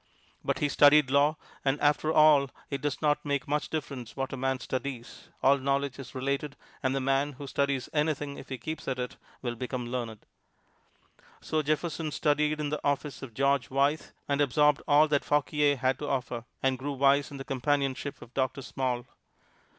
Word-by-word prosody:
But - - 0
he 145 - +1
studied 145 -1 +6
law, 145 +2 +4 0.3
and 135 +1 +1
after 150 +1 +2
all 150 -3 +6 0.2
it 140 -1 -2
does 145 0 -2
not 150 0 +2
make 140 -2 -1
much 150 +1 -1
difference 135 -6 -5
what 135 0 -3
a - - -1
man 135 0 -1
studies 130 -1 -5
all 140 +1 +5
knowledge 140 0 -1
is 135 -1 -9
related, 140 +2 -2 0.3
and 130 0 0
the - - +1
man 135 +2 +1
who 140 +2 -8
studies 140 -1 -1
anything 150 -2 0
if - - -10
he 130 - -4
keeps 155 +7 -6
at 130 -1 -1
it 125 0 -4 0.3
will 120 -2 -1
become 125 +1 -4
learned. 120 -3 -5 1.1
So 155 -1 -1
Jefferson 155 +1 -1
studied 150 +1 +1
in 150 -1 -1
the 150 - -3
office 145 -1 -1
of 120 -5 -9
George 140 -1 +2
Wythe, 140 +3 +2 0.3
and 140 0 +1
absorbed 150 +1 +3
all 150 +2 +6
that 145 -2 +1
Fauquier 145 0 +2
had 130 0 0
to 145 - -4
offer, 125 -3 -2 0.2
and 130 -1 +1
grew 140 +2 -3
wise 140 +1 +3
in 140 - -8
the 135 - -6
companionship 140 +1 -1
of 120 - -16
Doctor 130 0 -1
Small. 125 -2 -2
140 Hz, 185 wpm, -29 LUFS, 130-145 Hz, 1.1 s, studied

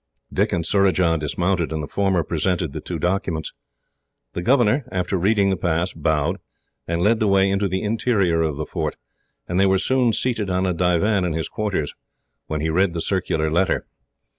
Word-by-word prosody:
Dick - - +1
and 85 -2 -1
Surajah 90 -4 +3
dismounted, 85 +3 -1
and 80 -1 -3
the - - -5
former 95 -2 +1
presented 85 -1 -1
the - - -5
two - - -4
documents. 90 -4 -2 0.8
The 85 - -3
governor, 125 +4 +3
after 90 +1 -1
reading 100 +2 +2
the - - +1
pass, 85 +1 -1
bowed, 80 -2 0 0.5
and 85 +1 -1
led 110 +2 +3
the 110 - +2
way 95 0 +3
into 100 +1 +1
the 95 +2 -2
interior 105 -6 +1
of 80 -3 -1
the 75 - -3
fort; - - -3 0.5
and 90 +1 -1
they 100 - +5
were 95 0 +3
soon 125 +3 +2
seated 110 -4 -1
on 90 +1 0
a 90 - +1
divan 90 +4 +2
in 90 -2 -1
his 80 0 -2
quarters, 100 -9 -2 0.5
when 75 -1 -3
he 80 - 0
read 90 +1 +2
the 85 - -3
circular 80 -5 0
letter. 90 +4 +1
90 Hz, 190 wpm, -22 LUFS, 80-100 Hz, 0.8 s, they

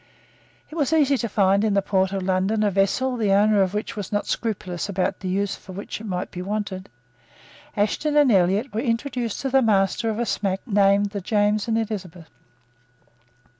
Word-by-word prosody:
It - - -9
was 295 -2 0
easy 285 -3 +4
to 235 - -2
find 200 0 +2
in 210 -2 +1
the 200 - +3
port 190 -1 +1
of 195 -1 -3
London 190 +3 +1
a 205 - +2
vessel 220 +7 +1
the 210 -4 +1
owner 205 +1 +4
of 190 +1 0
which 210 - -3
was 205 -4 -6
not 205 0 -1
scrupulous 185 -5 -3
about 190 0 -1
the 190 - -6
use 195 +2 -1
for 185 - -12
which 200 +3 -6
it - - -8
might 180 -2 -3
be 180 - -6
wanted. 195 -1 -4 0.9
Ashton 290 +9 0
and 290 -4 +5
Elliot 195 +6 +2
were 220 - -1
introduced 240 -2 -2
to 270 - -2
the 270 0 +4
master 210 0 +2
of 215 - -2
a 240 - 0
smack 195 -3 -1
named 200 -2 +3
the 200 -1 -4
James 210 +2 +1
and 225 -1 +1
Elizabeth. 185 -7 -5
205 Hz, 195 wpm, -23 LUFS, 195-225 Hz, 0.9 s, and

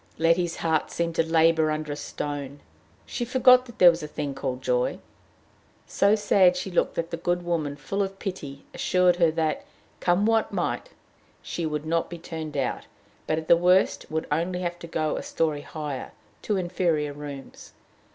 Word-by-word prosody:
Letty's 165 +1 +2
heart 160 -2 0
seemed 170 0 -2
to - - +5
labor 160 -1 +3
under 155 -1 -2
a - - -2
stone. 145 -1 -5 0.4
She 245 - -4
forgot 255 +1 +5
that 235 - -13
there 180 -1 +8
was 165 - -6
a 150 - -5
thing 145 -2 -4
called 130 -1 -4
joy. 125 0 +1 0.9
So 200 +2 +3
sad 190 -4 +4
she 185 +1 -4
looked 175 - +1
that 165 0 -3
the 170 - -2
good 175 +1 -1
woman, 155 -5 -1
full 195 +7 -3
of 195 0 -3
pity, 145 -9 -6
assured 180 -1 +2
her 170 -2 +4
that, 160 -1 -1 0.4
come 180 +3 +2
what 225 0 +2
might, - - -2 0.5
she 170 - -3
should 150 0 -3
not 165 +1 0
be 175 - -7
turned 160 -3 -6
out, 130 -3 -2 0.4
but 155 - +1
at 160 0 -4
the - - +7
worst 180 +2 +2
would 160 0 -2
only 175 +4 0
have 175 -1 -3
to 170 - -8
go 155 -2 -1
a - - -3
story 155 -3 -1
higher, 150 -4 -6 0.3
to 210 - -1
inferior 170 -5 0
rooms. 145 -2 -9
165 Hz, 180 wpm, -26 LUFS, 150-180 Hz, 0.9 s, there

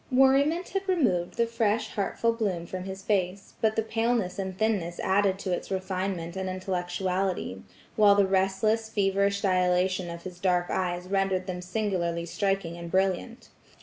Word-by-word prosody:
Worriment 275 +7 +4
had 390 +1 -3
removed 195 - +1
the 235 - +3
fresh 230 -1 0
heartful 230 +3 0
bloom 195 -7 -2
from 185 +1 -6
his 190 0 -7
face, 195 -1 -1
but 220 -1 +2
the 225 - +1
paleness 225 -4 0
and 190 -1 -4
thinness 195 -6 0
added 195 0 +2
to 195 -1 -4
its 175 - -2
refinement 185 -2 -3
and 190 0 -2
intellectuality; 185 - -2 0.3
while 205 -2 +6
the 200 -1 +4
restless 195 +4 +1
feverish 200 -1 +1
dilation 185 -1 +2
of 170 0 -7
his 180 -1 -8
dark 180 -1 +1
eyes 180 -1 -1
rendered 195 -1 0
them 180 -1 -4
singularly 180 -3 -1
striking 195 -1 -1
and 170 0 -7
brilliant. 190 +6 -1
190 Hz, 155 wpm, -27 LUFS, 180-215 Hz, 0.3 s, while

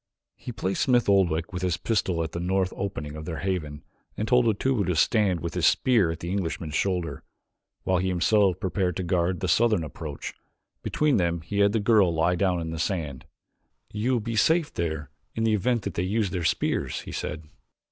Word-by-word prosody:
He - - -8
placed 95 -4 -2
Smith 125 -2 +3
Oldwick, 90 -4 +2
with 90 - -4
his 90 -2 0
pistol, 95 -7 0
at 80 - -5
the 85 - -4
north 95 +1 0
opening 80 -7 -4
of 75 0 -7
their 80 -1 -4
haven 80 -6 -3 0.3
and 110 - -2
told 125 0 +4
Otobu 110 +1 +1
to 90 - +1
stand 95 0 +2
with 85 -1 -4
his 90 -2 +2
spear 115 -10 +3
at 80 0 -5
the 85 - -4
Englishman's 85 -5 -3
shoulder, 90 -1 -1 0.6
while 95 -1 +1
he 95 - -1
himself 95 +1 +2
prepared 95 -2 -1
to 95 - -2
guard 90 -1 0
the 95 - -1
southern 105 0 +3
approach. 75 -1 -6 0.5
Between 150 -5 +1
them 85 -2 0
he 100 +5 -3
had 100 0 +5
the 110 - +1
girl 105 -4 +4
lie 85 +2 +2
down 90 -1 +1
in 80 -1 -4
the 80 - -5
sand. 80 -7 -3 0.7
"You 110 +5 0
will 120 - +2
be 115 +1 -4
safe 160 +8 +2
there 80 -4 -3 0.2
in 115 - -1
the 110 -1 +3
event 115 +2 +1
that 100 - -4
they - - -1
use 100 +1 0
their 90 -3 -2
spears," - - 0
he - - -9
said. 80 +1 -4
95 Hz, 205 wpm, -26 LUFS, 85-105 Hz, 0.7 s, had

